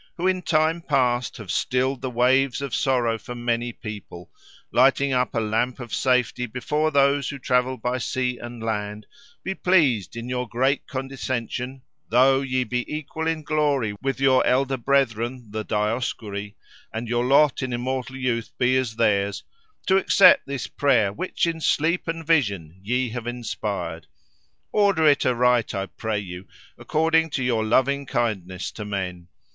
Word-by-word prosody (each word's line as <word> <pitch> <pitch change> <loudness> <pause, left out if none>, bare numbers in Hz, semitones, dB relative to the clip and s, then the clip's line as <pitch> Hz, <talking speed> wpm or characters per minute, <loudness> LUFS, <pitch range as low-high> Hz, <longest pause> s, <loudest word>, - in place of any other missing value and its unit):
who 175 - -2
in 185 -1 +2
time 160 0 +1
past 125 -5 0
have 105 -6 -6
stilled 130 +7 0
the 130 - -3
waves 125 +2 +2
of 140 -2 -5
sorrow 120 -4 +1
for 125 +3 -8
many 120 0 -1
people, 105 -6 -9 0.4
lighting 135 +2 +3
up 125 -1 0
a - - +2
lamp 115 +4 -1
of 120 -3 -8
safety 125 -1 +1
before 150 +7 -1
those 140 -1 +2
who 140 - -5
travel 125 0 +1
by 125 +2 -2
sea 125 -1 -2
and 120 -1 -8
land, 105 -1 -3 0.4
be 190 - -2
pleased, 150 - +2
in 115 +1 -6
your 125 -1 -3
great 130 +4 0
condescension, 130 -1 -4 0.3
though 135 +3 +4
ye 130 -1 0
be 125 0 -2
equal 155 +1 -4
in 160 -1 -1
glory 145 -8 0
with 135 0 -2
your 135 -1 +4
elder 135 +1 +2
brethren 125 -2 0
the 110 0 -3
Dioscuri, 105 -2 -2 0.4
and 115 +2 -4
your 120 +1 0
lot 140 +1 +4
in 130 -1 -3
immortal 130 +2 -3
youth 120 -3 -1
be 125 +1 +2
as 125 -4 -1
theirs, 100 -3 +1 0.4
to 190 - +4
accept 190 -1 +6
this 140 -3 -3
prayer, 120 -8 +2
which 185 - -1
in 165 -1 -2
sleep 165 +4 +1
and 165 0 -4
vision 100 - 0
ye 125 +5 0
have 120 0 -6
inspired. 100 -9 -4 0.6
Order 200 -6 +3
it 145 -2 +4
aright, 125 -2 +2
I 95 0 -1
pray 110 +2 -4
you, 90 -2 -7 0.3
according 160 +1 +1
to 130 - -2
your 120 -3 +1
loving 135 +5 +1
kindness 100 -8 -2
to 105 - -7
men. 95 -4 -4
125 Hz, 160 wpm, -24 LUFS, 115-140 Hz, 0.6 s, accept